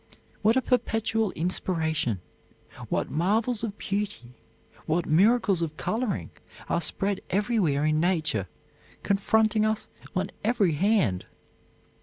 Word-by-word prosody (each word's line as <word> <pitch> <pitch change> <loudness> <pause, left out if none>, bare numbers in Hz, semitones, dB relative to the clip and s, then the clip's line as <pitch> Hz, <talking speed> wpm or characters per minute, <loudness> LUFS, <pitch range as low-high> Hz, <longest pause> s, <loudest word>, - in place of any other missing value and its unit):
What 220 +2 +4
a 260 - +2
perpetual 225 -3 +1
inspiration, 160 - -1 0.7
what - - -1
marvels 215 - +1
of 210 -3 -3
beauty, 200 -12 -3 0.5
what 165 +2 +1
miracles 195 +2 +3
of 155 -2 -3
coloring 215 - -2 0.4
are - - 0
spread 195 +4 -1
everywhere 190 -8 +1
in 155 0 +2
nature, 155 - +1 0.6
confronting 215 +2 +2
us 215 0 -1 0.3
on 185 +1 -1
every 210 -5 +2
hand! 150 - +1
195 Hz, 110 wpm, -27 LUFS, 160-220 Hz, 0.7 s, What